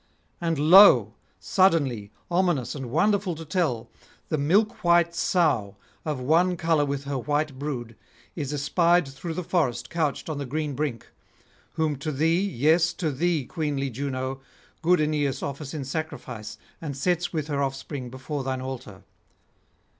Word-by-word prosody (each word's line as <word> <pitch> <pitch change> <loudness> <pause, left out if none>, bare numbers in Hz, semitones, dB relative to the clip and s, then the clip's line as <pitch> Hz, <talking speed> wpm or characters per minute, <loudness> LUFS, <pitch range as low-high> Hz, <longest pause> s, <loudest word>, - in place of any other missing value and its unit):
And 165 -2 0
lo! 150 - +7 0.3
suddenly, 145 - +2 0.2
ominous 175 -8 +1
and 135 -4 -6
wonderful 195 - +1
to 165 +1 -8
tell, 150 -8 -1 0.4
the 155 - 0
milk 210 +10 +2
white 170 -1 +4
sow, 145 - +1 0.3
of 150 -4 -2
one 170 +7 +2
colour 165 -3 +2
with 140 -1 -3
her 140 -1 -3
white 145 0 -1
brood, 125 -6 -4 0.4
is 145 -4 -3
espied 170 +3 +2
through 135 +5 -6
the 180 - -3
forest 130 -9 -1
couched 160 -4 -1
on 155 -3 -3
the 140 - -4
green 150 +2 -2
brink; 135 -4 -4 0.6
whom 155 -3 0
to 145 +3 -3
thee, 165 +5 +2
yes 170 -1 +2
to 165 -5 -2
thee, 160 0 0
queenly 145 -3 -2
Juno, 130 +1 -3 0.4
good 175 +1 +4
Aeneas 145 -3 0
offers 140 0 -5
in 145 -4 -5
sacrifice, 130 -7 -5 0.2
and 145 -4 -5
sets 175 +4 0
with 155 -4 -2
her 145 -2 -2
offspring 135 -1 -4
before 135 +3 -5
thine 130 0 -2
altar. 130 -7 -7
150 Hz, 150 wpm, -26 LUFS, 135-170 Hz, 0.6 s, lo